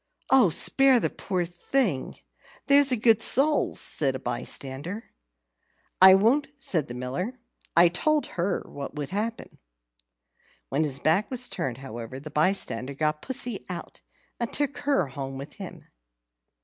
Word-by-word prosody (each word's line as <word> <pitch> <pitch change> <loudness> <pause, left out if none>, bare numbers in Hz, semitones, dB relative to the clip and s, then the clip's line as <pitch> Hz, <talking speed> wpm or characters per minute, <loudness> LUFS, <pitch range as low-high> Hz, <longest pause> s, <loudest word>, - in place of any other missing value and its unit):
"Oh, 260 -8 +6
spare 265 - +5
the - - -1
poor 180 -3 -3
thing, 175 - -1 0.5
there's 280 -1 +5
a - - +3
good 225 0 +3
soul," 290 +6 +3
said 135 -3 -1
a - - -5
bystander. 135 - -5 0.9
"I 190 0 +10
won't," 240 +9 +2
said 175 - 0
the 120 - -8
Miller. 135 - -4 0.4
"I 170 +1 +8
told 300 - 0
her 180 +2 -2
what 140 +1 -8
would 150 +2 -5
happen." 220 +4 -4 1.1
When 145 +4 0
his 135 -3 -2
back 160 +9 +1
was 250 -1 -1
turned, 125 -3 -4
however, 120 -1 -8
the 150 +2 -10
bystander 150 -6 -1
got 150 +1 -1
Pussy 245 -4 -1
out, 175 -2 -8 0.4
and 235 -1 -3
took 285 -2 -2
her 280 - +1
home 135 0 -6
with 140 +1 -9
him. - - -9
180 Hz, 145 wpm, -26 LUFS, -, 1.1 s, I